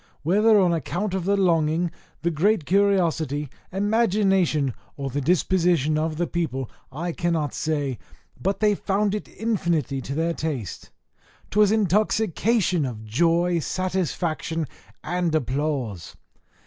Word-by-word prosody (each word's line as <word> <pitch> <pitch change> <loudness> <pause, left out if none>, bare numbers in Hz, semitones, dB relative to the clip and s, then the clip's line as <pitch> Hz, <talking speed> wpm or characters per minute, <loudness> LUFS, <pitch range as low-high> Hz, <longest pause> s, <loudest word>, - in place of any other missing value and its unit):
Whether 210 +7 +4
on 180 -3 +3
account 175 +5 -2
of 190 -2 -2
the 200 +1 +2
longing, 165 -2 +2 0.3
the 170 - +1
great 170 +2 +2
curiosity, 165 -7 +1 0.2
imagination, 195 - +2 0.2
or 135 -2 -4
the 145 +3 -1
disposition 170 -1 +2
of 155 0 -1
the 175 - +1
people, 135 -8 -3 0.2
I 170 +6 -3
cannot 165 -5 -1
say 145 -5 -2 0.4
but 195 +1 -1
they 210 -1 +4
found 200 +1 0
it 210 - -4
infinitely 170 -11 -1
to 140 - -5
their 165 +2 0
taste; 145 - -4 0.6
'twas 210 0 +4
intoxication 210 -2 +2
of 115 -5 -5
joy, 170 +9 +2
satisfaction, 170 -2 -2 0.4
and 175 -1 0
applause. 130 - -2
170 Hz, 120 wpm, -24 LUFS, 150-195 Hz, 0.6 s, Whether